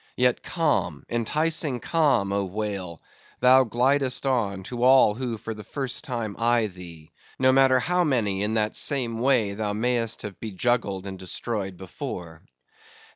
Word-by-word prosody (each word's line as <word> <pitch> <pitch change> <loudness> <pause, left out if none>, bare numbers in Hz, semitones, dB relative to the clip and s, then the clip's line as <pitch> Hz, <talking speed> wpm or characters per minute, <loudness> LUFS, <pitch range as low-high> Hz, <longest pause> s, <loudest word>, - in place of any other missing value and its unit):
Yet 125 -1 +2
calm, 165 -4 -1
enticing 150 +3 0
calm, 135 -13 +1
oh, 100 0 0
whale! 95 -4 -5 0.4
thou 130 +1 +6
glidest 125 +3 +1
on, 105 -8 0
to 120 +4 -6
all 130 -4 +6
who 120 0 -4
for 115 +1 -6
the 105 -1 -10
first 130 +4 -4
time 115 -8 -4
eye 120 0 +3
thee, 85 -5 -10 0.3
no 130 0 +4
matter 130 -1 +5
how 180 +7 +1
many 110 - 0
in 105 +2 0
that 110 -1 0
same 120 -6 0
way 120 -5 +2
thou 105 0 -2
may'st 115 +1 -1
have 105 -3 -7
bejuggled 105 -2 -1
and 95 -1 -7
destroyed 95 +1 -4
before. 90 - -7
115 Hz, 150 wpm, -25 LUFS, 100-130 Hz, 0.4 s, thou